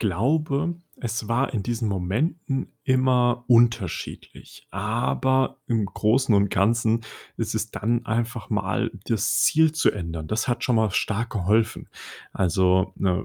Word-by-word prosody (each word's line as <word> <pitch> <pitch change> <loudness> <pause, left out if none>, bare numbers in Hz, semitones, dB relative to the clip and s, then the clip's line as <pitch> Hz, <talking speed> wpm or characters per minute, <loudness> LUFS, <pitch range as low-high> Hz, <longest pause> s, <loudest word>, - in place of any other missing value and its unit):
glaube, 140 - 0 0.2
es 115 -2 -4
war 125 +2 0
in 100 - -1
diesen 115 -1 -2
Momenten 135 - -2
immer 125 -2 +2
unterschiedlich. 115 -6 0
Aber 120 +6 0
im 110 -4 +1
Großen 115 +4 +2
und 100 -1 +3
Ganzen 115 +2 +2 0.3
ist - - -3
es - - -2
dann 115 +3 -1
einfach 115 -1 -3
mal 105 +3 -1
das 115 -1 0
Ziel 160 0 +4
zu 160 - +2
ändern. 85 -5 -5
Das 110 - -2
hat 120 - -1
schon 125 - +2
mal 110 -2 +2
stark 110 +4 -1
geholfen. 110 +2 0 0.4
Also, 95 0 +2
ne, 90 -2 0
115 Hz, 135 wpm, -24 LUFS, 100-125 Hz, 0.4 s, Ziel